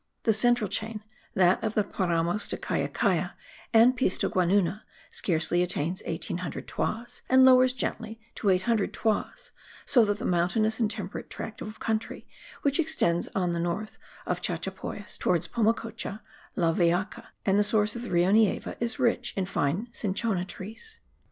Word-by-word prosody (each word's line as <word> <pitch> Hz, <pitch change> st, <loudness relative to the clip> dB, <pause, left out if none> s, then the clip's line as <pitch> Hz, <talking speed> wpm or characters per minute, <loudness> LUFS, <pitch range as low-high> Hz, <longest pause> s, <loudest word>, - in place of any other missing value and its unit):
The 225 Hz, -, +3 dB
central 240 Hz, 0 st, +3 dB
chain, 220 Hz, +1 st, -4 dB, 0.3 s
that 185 Hz, +4 st, +3 dB
of 220 Hz, -1 st, -2 dB
the 210 Hz, -, +3 dB
Paramos 175 Hz, 0 st, 0 dB
de -, -, -2 dB
Callacalla, -, -, -1 dB, 0.4 s
and 235 Hz, +3 st, +6 dB
Piscoguanuna, 190 Hz, -4 st, +1 dB, 0.3 s
scarcely 175 Hz, 0 st, +2 dB
attains 180 Hz, 0 st, -1 dB
1800 175 Hz, +1 st, -4 dB
toises, 240 Hz, +3 st, -3 dB
and 260 Hz, 0 st, +7 dB
lowers 255 Hz, 0 st, +6 dB
gently 225 Hz, -3 st, -4 dB
to 205 Hz, -, -1 dB
800 195 Hz, +3 st, +1 dB
toises; 220 Hz, -2 st, -2 dB, 0.3 s
so 245 Hz, -4 st, +5 dB
that 205 Hz, 0 st, 0 dB
the 235 Hz, -, -5 dB
mountainous 215 Hz, +6 st, +1 dB
and 225 Hz, -3 st, +2 dB
temperate 205 Hz, -3 st, -5 dB
tract 220 Hz, -, -7 dB
of 215 Hz, +1 st, -7 dB
country 220 Hz, 0 st, -3 dB, 0.4 s
which 280 Hz, +1 st, +2 dB
extends 300 Hz, -, +1 dB
on 180 Hz, -2 st, +1 dB
the 170 Hz, -, -2 dB
north 175 Hz, +6 st, -3 dB, 0.3 s
of -, -, -2 dB
Chachapoyas -, -, -4 dB
towards 175 Hz, -1 st, +1 dB
Pomacocha, 225 Hz, -1 st, -1 dB, 0.3 s
La 165 Hz, -4 st, +2 dB
Vellaca 175 Hz, +4 st, 0 dB, 0.2 s
and 195 Hz, +1 st, +3 dB
the -, -, +4 dB
source 210 Hz, 0 st, +1 dB
of 235 Hz, -, -5 dB
the 245 Hz, -, -6 dB
Rio 175 Hz, +2 st, +3 dB
Nieva 215 Hz, -1 st, +2 dB
is 235 Hz, +1 st, -1 dB
rich 245 Hz, -1 st, 0 dB
in 190 Hz, -, 0 dB
fine 180 Hz, +4 st, -1 dB
cinchona 200 Hz, -3 st, -1 dB
trees. 225 Hz, -, -9 dB
210 Hz, 150 wpm, -27 LUFS, 180-230 Hz, 0.4 s, and